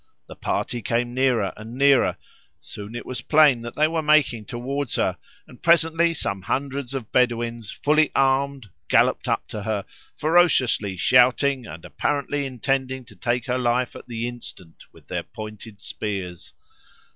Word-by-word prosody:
The -, -, -11 dB
party 120 Hz, -1 st, -2 dB
came 120 Hz, +2 st, -1 dB
nearer 125 Hz, -6 st, +1 dB
and 110 Hz, +3 st, -9 dB
nearer; 140 Hz, -1 st, +4 dB, 0.4 s
soon 105 Hz, +2 st, -9 dB
it 120 Hz, -, -6 dB
was 130 Hz, -1 st, -5 dB
plain 150 Hz, -6 st, +5 dB
that 120 Hz, 0 st, -7 dB
they 155 Hz, +1 st, +4 dB
were 165 Hz, 0 st, -1 dB
making 150 Hz, -8 st, +3 dB
towards 130 Hz, +3 st, -3 dB
her, -, -, +1 dB, 0.3 s
and 125 Hz, -, -17 dB
presently 165 Hz, 0 st, +3 dB
some 100 Hz, -9 st, -2 dB
hundreds 140 Hz, +4 st, -3 dB
of 125 Hz, -5 st, -5 dB
Bedouins, 120 Hz, -3 st, 0 dB
fully 155 Hz, +1 st, +2 dB
armed, 135 Hz, -4 st, +1 dB, 0.2 s
galloped -, -, +3 dB
up -, -, -1 dB
to 105 Hz, -, -5 dB
her, 100 Hz, -1 st, -2 dB, 0.3 s
ferociously 140 Hz, -, +3 dB
shouting, 125 Hz, +3 st, +3 dB
and 80 Hz, +2 st, -10 dB
apparently 145 Hz, -1 st, -1 dB
intending 130 Hz, +1 st, -2 dB
to -, -, -16 dB
take 120 Hz, 0 st, -1 dB
her 125 Hz, 0 st, -1 dB
life 125 Hz, 0 st, 0 dB
at -, -, -11 dB
the 120 Hz, 0 st, -3 dB
instant 105 Hz, -8 st, -10 dB
with -, -, -20 dB
their -, -, -2 dB
pointed 110 Hz, -1 st, -10 dB
spears. 95 Hz, -5 st, -5 dB
125 Hz, 155 wpm, -23 LUFS, 115-140 Hz, 0.4 s, plain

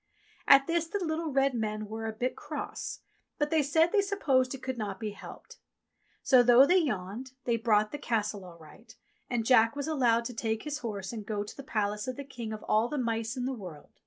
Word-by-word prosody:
At 275 Hz, -1 st, +8 dB
this 335 Hz, 0 st, 0 dB
the 410 Hz, -, -2 dB
little 320 Hz, 0 st, -2 dB
red 275 Hz, 0 st, +2 dB
men 215 Hz, -2 st, -2 dB
were 225 Hz, +1 st, -5 dB
a -, -, -1 dB
wee 220 Hz, -, -8 dB
bit 255 Hz, +1 st, 0 dB
cross; 300 Hz, -1 st, -6 dB, 0.4 s
but 295 Hz, -1 st, -1 dB
they 320 Hz, -1 st, +4 dB
said 320 Hz, +4 st, +3 dB
they 415 Hz, -, +4 dB
supposed 280 Hz, -11 st, +1 dB
it 265 Hz, -, -13 dB
could 260 Hz, -2 st, -4 dB
not 205 Hz, -3 st, -4 dB
be 215 Hz, -2 st, -3 dB
helped; 205 Hz, -, -12 dB, 0.6 s
so, 255 Hz, -3 st, +6 dB
though 245 Hz, +2 st, +7 dB
they 365 Hz, +5 st, +4 dB
yawned, 245 Hz, -, -3 dB
they 235 Hz, -, +2 dB
brought 215 Hz, -2 st, +2 dB
the 295 Hz, -, -5 dB
Castle 210 Hz, -6 st, -1 dB
all 175 Hz, -2 st, -12 dB
right, 195 Hz, +8 st, -16 dB, 0.3 s
and 235 Hz, -2 st, -1 dB
Jack 230 Hz, 0 st, +5 dB
was 285 Hz, 0 st, -3 dB
allowed 240 Hz, -7 st, +2 dB
to 245 Hz, -, -4 dB
take 220 Hz, -1 st, -2 dB
his 300 Hz, -1 st, -4 dB
horse 205 Hz, -5 st, -5 dB
and 220 Hz, -2 st, -5 dB
go 205 Hz, 0 st, -3 dB
to 210 Hz, -, -10 dB
the -, -, -8 dB
palace 210 Hz, -3 st, -2 dB
of 255 Hz, -, -3 dB
the 280 Hz, -, -6 dB
King 240 Hz, -5 st, -7 dB
of 215 Hz, -1 st, -6 dB
all 215 Hz, +2 st, +2 dB
the 295 Hz, -, -4 dB
Mice 230 Hz, 0 st, -2 dB
in 250 Hz, -, -2 dB
the 265 Hz, -, -1 dB
World. 180 Hz, -, -10 dB
240 Hz, 230 wpm, -29 LUFS, 215-275 Hz, 0.6 s, At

